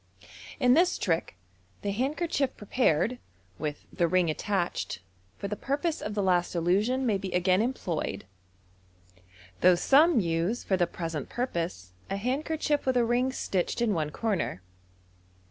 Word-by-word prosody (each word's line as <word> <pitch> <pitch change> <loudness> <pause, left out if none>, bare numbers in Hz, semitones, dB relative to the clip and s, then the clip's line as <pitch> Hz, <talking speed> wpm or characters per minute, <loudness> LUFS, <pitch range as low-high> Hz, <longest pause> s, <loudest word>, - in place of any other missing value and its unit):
— - - -14
In 250 - +7
this 350 +5 +4
trick, - - -1 0.5
the 200 - 0
handkerchief 275 - -1
prepared 230 - +1 0.4
(with 150 -1 -4
the 170 -3 +2
ring 175 -1 +2
attached) 185 +2 -2 0.4
for 200 - -4
the 210 - -3
purpose 285 - -2
of 210 0 -4
the 205 - 0
last 180 -1 +1
illusion 205 +10 +1
may 210 -5 +1
be 190 -1 -5
again 185 +2 +3
employed, 220 -9 -2 1.3
though 180 0 +6
some 290 - +5
use 170 +5 0
for 190 - +1
the 175 -2 +2
present 165 -4 -5
purpose 170 - -3 0.2
a 195 - -1
handkerchief 290 +5 -1
with 260 -1 +3
a 240 - +4
ring 245 +3 +1
stitched 190 -7 -2
in 235 -3 +2
one 155 -4 -1
corner. 190 - -2
205 Hz, 145 wpm, -28 LUFS, 175-255 Hz, 1.3 s, In